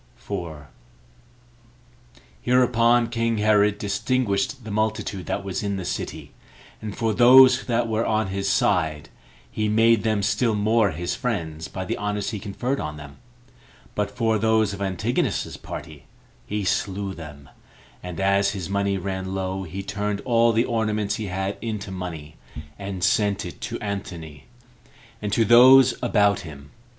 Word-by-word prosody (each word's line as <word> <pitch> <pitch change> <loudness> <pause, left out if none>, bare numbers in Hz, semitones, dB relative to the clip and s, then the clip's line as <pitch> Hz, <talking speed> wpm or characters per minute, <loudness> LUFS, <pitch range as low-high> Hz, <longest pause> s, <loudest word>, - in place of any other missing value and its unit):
4. 80 -5 -7 1.7
Hereupon 120 -1 +3
king 115 -1 -1
Herod 105 -1 +3
distinguished 105 +3 -1
the 110 - -7
multitude 110 -3 -2
that - - -2
was 95 -2 -3
in 100 -1 -2
the 95 - -5
city; 90 - -5 0.5
and 105 -2 -6
for 115 -2 0
those 125 +2 +7
that 120 -1 +1
were 110 0 0
of 110 -3 0
his 100 0 -2
side, 80 -7 +1 0.4
he 110 -1 -1
made 115 0 +4
them 110 -2 0
still 110 +1 +1
more 105 +1 +2
his 85 +2 -3
friends 80 - -3
by 95 - -6
the - - -3
honors 105 0 -2
he 105 - -4
conferred 120 +7 -3
on 75 0 -5
them; 70 -1 -11 0.8
but 105 -1 -1
for 115 -3 0
those 110 -1 +2
of 100 - -7
Antigonus's 95 -3 -1
party, 70 -5 -9 0.4
he 105 0 -2
slew 95 +1 -1
them; 75 -5 -11 0.5
and 90 -2 -7
as 100 +1 +2
his 95 -2 -5
money 100 0 0
ran 95 0 -4
low, 95 0 -3
he 95 +4 -6
turned 100 0 -3
all 115 -1 +3
the 115 +2 +2
ornaments 110 -3 -1
he 110 -3 -4
had 95 +2 -3
into 105 -3 -4
money, 85 -5 -7 0.4
and 95 -2 -5
sent 100 0 +1
it - - -9
to - - -4
Antony, 85 -8 -6 0.8
and 105 -1 -3
to 115 +2 +3
those 125 +3 +7
about 100 -2 +2
him. 70 -3 -11
100 Hz, 150 wpm, -24 LUFS, 95-110 Hz, 1.7 s, those